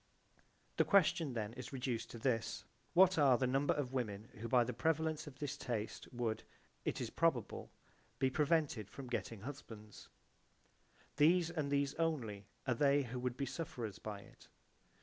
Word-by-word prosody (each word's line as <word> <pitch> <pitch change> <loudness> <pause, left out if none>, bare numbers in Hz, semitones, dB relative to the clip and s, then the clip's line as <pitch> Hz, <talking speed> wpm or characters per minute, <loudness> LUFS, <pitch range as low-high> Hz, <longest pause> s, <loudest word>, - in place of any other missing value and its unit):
J.B.) - - -30 0.4
The - - +4
question 165 -7 +4
then 110 -2 -3
is 125 -1 -7
reduced 125 -4 -2
to - - -8
this. 115 -1 -1 0.3
What 185 -1 +7
are 135 -4 +6
the 130 - +1
number 135 +3 +2
of 135 -3 -2
women 110 -3 -2
who 115 - -4
by 120 +1 +5
the - - -3
prevalence 160 -1 0
of 135 -3 -10
this 145 0 -3
taste 115 -6 -4
would, 120 -3 -1 0.4
it - - -1
is - - -3
probable, - - 0 0.5
be 130 -1 +2
prevented 150 - +1
from 135 - -8
getting 115 -3 -3
husbands? 110 -5 -9 1.1
These 170 +3 +5
and 155 -4 -1
these 140 -1 +1
only 115 -12 -1 0.2
are 130 - +2
they 140 +3 +4
who 125 0 -5
would 125 0 -2
be 140 - -1
sufferers 120 - -5
by 105 -2 -6
it. - - -17
130 Hz, 170 wpm, -37 LUFS, 115-145 Hz, 1.1 s, What